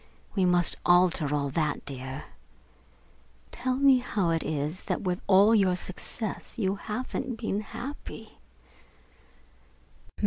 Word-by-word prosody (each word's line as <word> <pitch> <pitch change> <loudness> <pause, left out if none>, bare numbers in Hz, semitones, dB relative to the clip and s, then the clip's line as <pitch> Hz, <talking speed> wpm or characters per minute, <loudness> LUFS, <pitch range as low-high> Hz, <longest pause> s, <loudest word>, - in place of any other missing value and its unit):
We 190 -3 +2
must 175 -1 +3
alter 175 -4 +4
all 140 -1 0
that, 150 0 -1
dear. 130 0 -6 1.3
Tell 255 0 -1
me 270 -1 +5
how 200 -8 0
it 165 -1 +1
is 155 +3 -2
that - - -1
with 180 -1 -1
all 200 +3 +6
your 195 -4 +4
success 195 +6 -4
you 195 -4 +1
haven't 245 +4 -4
been 215 -2 -2
happy?" 265 +6 -8
185 Hz, 115 wpm, -28 LUFS, 160-225 Hz, 1.3 s, all